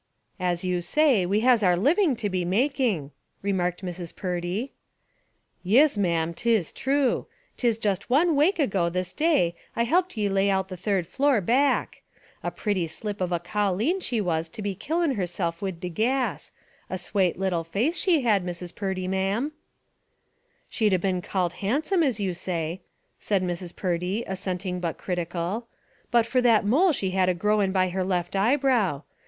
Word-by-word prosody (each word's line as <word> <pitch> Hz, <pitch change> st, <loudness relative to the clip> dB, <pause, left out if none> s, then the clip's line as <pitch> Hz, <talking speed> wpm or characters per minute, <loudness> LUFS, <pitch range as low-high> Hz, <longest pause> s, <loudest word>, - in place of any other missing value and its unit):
"As 180 Hz, -1 st, -1 dB
you 180 Hz, -1 st, 0 dB
say, 255 Hz, -, +3 dB
we 205 Hz, +3 st, +1 dB
has 245 Hz, -1 st, +4 dB
our 180 Hz, -3 st, +3 dB
living 295 Hz, -, +3 dB
to 220 Hz, -2 st, -2 dB
be 185 Hz, -2 st, -1 dB
making," 210 Hz, -, 0 dB, 0.3 s
remarked 185 Hz, -2 st, -1 dB
Mrs. 175 Hz, -1 st, -6 dB
Purdy. 180 Hz, +7 st, -3 dB, 0.9 s
"Yis, 255 Hz, +10 st, +4 dB
ma'am; 170 Hz, -4 st, 0 dB
'tis 220 Hz, -3 st, +1 dB
true. 270 Hz, -1 st, 0 dB, 0.3 s
'Tis 235 Hz, -3 st, +1 dB
just 200 Hz, -2 st, -2 dB
one 310 Hz, +5 st, +3 dB
wake 330 Hz, +7 st, +3 dB
ago 195 Hz, -, +1 dB
this 185 Hz, +1 st, -3 dB
day 300 Hz, -, +2 dB, 0.2 s
I 235 Hz, -, +2 dB
helped 350 Hz, +4 st, +1 dB
ye 210 Hz, -1 st, +1 dB
lay 195 Hz, 0 st, +2 dB
out 190 Hz, -1 st, 0 dB
the 185 Hz, -, -5 dB
third 190 Hz, 0 st, -1 dB
floor, 275 Hz, -, +2 dB
back. 255 Hz, +8 st, +1 dB, 0.4 s
A -, -, -2 dB
pretty 195 Hz, -6 st, -1 dB
slip 205 Hz, +4 st, -5 dB
of 180 Hz, -1 st, -1 dB
a 175 Hz, -, +2 dB
colleen 205 Hz, -, 0 dB
she 240 Hz, -10 st, -2 dB
was 165 Hz, -4 st, -1 dB
to 215 Hz, +2 st, -8 dB
be 200 Hz, -1 st, -1 dB
killin' 325 Hz, -, 0 dB
herself 175 Hz, -5 st, -2 dB
wid 190 Hz, -4 st, -4 dB
the 180 Hz, -, -3 dB
gas 245 Hz, +8 st, -1 dB, 0.2 s
— -, -, -34 dB
a 185 Hz, -, -2 dB
swate 185 Hz, 0 st, 0 dB
little 185 Hz, -3 st, 0 dB
face 215 Hz, -, 0 dB
she 360 Hz, -8 st, +2 dB
had, 210 Hz, -6 st, +2 dB
Mrs. 175 Hz, 0 st, -6 dB
Purdy, 190 Hz, -2 st, -3 dB
ma'am." 195 Hz, +9 st, 0 dB, 1.2 s
"She'd 215 Hz, -4 st, +1 dB
a -, -, +4 dB
been 185 Hz, 0 st, -1 dB
called 180 Hz, -2 st, -1 dB
handsome, 300 Hz, -, +1 dB
as 265 Hz, -8 st, +1 dB
you 190 Hz, -3 st, -1 dB
say," 170 Hz, -1 st, -3 dB, 0.4 s
said 195 Hz, -3 st, 0 dB
Mrs. 175 Hz, -1 st, -4 dB
Purdy, 180 Hz, +4 st, -1 dB
assenting 185 Hz, -1 st, -3 dB
but 170 Hz, -3 st, -3 dB
critical, 175 Hz, +5 st, -3 dB, 0.4 s
"but 235 Hz, -2 st, +3 dB
for 250 Hz, +2 st, +1 dB
that 230 Hz, -4 st, +4 dB
mole 315 Hz, -, +4 dB
she 195 Hz, -10 st, -1 dB
had 185 Hz, -1 st, +2 dB
a 180 Hz, -, +1 dB
growin' 210 Hz, +1 st, +1 dB
by 185 Hz, -1 st, +2 dB
her 185 Hz, +1 st, -1 dB
left 180 Hz, -1 st, -1 dB
eyebrow. 225 Hz, -, +2 dB
195 Hz, 170 wpm, -26 LUFS, 180-240 Hz, 1.2 s, has